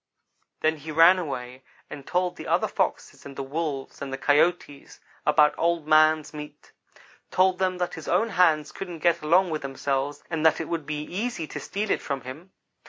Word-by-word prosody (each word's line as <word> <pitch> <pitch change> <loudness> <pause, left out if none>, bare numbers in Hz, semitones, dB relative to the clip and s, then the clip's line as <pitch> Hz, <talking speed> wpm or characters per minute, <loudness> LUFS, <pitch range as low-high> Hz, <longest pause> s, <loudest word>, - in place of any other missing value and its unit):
Then 155 0 +1
he 155 +2 -8
ran 165 +4 +6
away 130 -5 -6 0.3
and 140 -2 -10
told 180 0 0
the - - -9
other - - +2
Foxes - - -3
and 140 -1 -10
the 135 - -4
Wolves 140 -1 -4
and 140 -1 -5
the 135 - -3
Coyotes 145 0 0 0.3
about 150 0 +5
Old 170 -2 +1
man's 155 0 +4
meat. 150 -1 -10 0.6
Told 185 0 +2
them 185 -1 0
that 180 -1 -2
his 160 - -8
own 230 - +2
hands 160 -6 +2
couldn't 180 -3 -7
get 170 0 +3
along 175 +4 +3
with 155 - -2
themselves 140 +1 -3
and 160 -2 -3
that 160 -1 +4
it 160 - -4
would 165 -4 -4
be 150 0 -3
easy 195 +1 -4
to - - -7
steal 210 +1 -3
it - - +1
from 140 -1 -4
him. 150 +9 -10
155 Hz, 190 wpm, -25 LUFS, 145-175 Hz, 0.6 s, ran